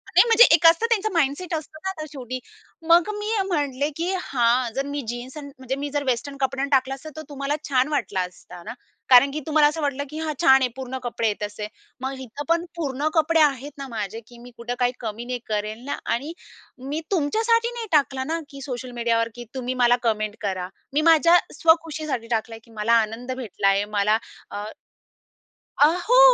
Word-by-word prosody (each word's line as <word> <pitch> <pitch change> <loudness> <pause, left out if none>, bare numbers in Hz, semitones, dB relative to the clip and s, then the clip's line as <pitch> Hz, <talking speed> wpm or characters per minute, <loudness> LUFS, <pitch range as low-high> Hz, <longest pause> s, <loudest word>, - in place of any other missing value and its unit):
नाही, - - +9
म्हणजे 460 +1 +8
एक 330 - -1
असतं, 335 +7 +5
त्यांचं 435 -1 +1
माइंडसेट 330 +2 0
असतं 310 0 -7
ना 380 - -1
आता 340 -5 -5
शेवटी. 255 -3 -6 0.5
मग 340 +2 +5
मी 420 +1 -3 0.2
म्हटले, 290 -5 -1
की 340 +3 -1
"हां, 240 -1 +1
जर 275 +1 -1
मी 285 0 -3
जीन्स 240 +4 -6
आणि 285 -1 -8
म्हणजे 260 0 -3
मी 290 - -2
जर 290 - +1
वेस्टर्न 275 +3 -2
कपड्यांन 270 +1 0
टाकला 265 0 +3
असता, 295 +3 -10
तर 315 - -4
तुम्हाला 280 +1 -2
छान 260 -1 +3
वाटला 190 -9 0
असता 180 0 -13
ना, - - -6 0.4
कारण 265 +2 +7
की 300 - -3
तुम्हाला 305 -1 +5
असं 315 +2 -5
वाटलं 285 -1 -1
की 305 - -7
'हां, 315 -1 -2
छान 265 0 +6
आहे. 255 - +3
पूर्ण 260 0 -5
कपडे 230 -2 -1
आहेत,' 210 0 -2
असे. 210 0 -6 0.3
मग 265 0 -4
इथं 260 +2 -7
पण 335 +1 +2
पूर्ण 290 -3 -2
कपडे 325 +1 +3
आहेत 285 -1 +1
ना 275 - -6
माझे 220 -3 -4
की 240 - -15
मी - - -12
कुठे 235 +1 -4
काही 245 0 +3
कमी 225 0 -5
नाही 250 0 -3
करेल 215 +2 -3
ना 285 - -3 0.2
आणि 285 +7 -5 0.6
मी 305 +3 -2
तुमच्यासाठी 450 +8 +2
नाही 470 -2 -5
टाकला 275 -3 +2
ना 330 - 0
की 275 -1 -10
सोशल 255 -1 -6
मीडियावर 230 -1 +1
की 240 0 -8
तुम्ही 255 0 -2
मला 240 0 +6
कमेंट 215 -1 0
करा. 185 -3 -3 0.2
मी 295 - +2
माझ्या 335 +2 +6 0.2
स्वखुशीसाठी 310 -6 +1
टाकलंय, 225 0 -4
की 230 - -20
मला 230 +2 +3
आनंद 235 +4 -7
भेटलाय, 200 -4 +1
मला" 210 +2 +3 0.3
अ, 205 - -5 1.2
अ, - - +10 0.2
हो, - - +6
270 Hz, 200 wpm, -24 LUFS, 235-310 Hz, 1.2 s, अ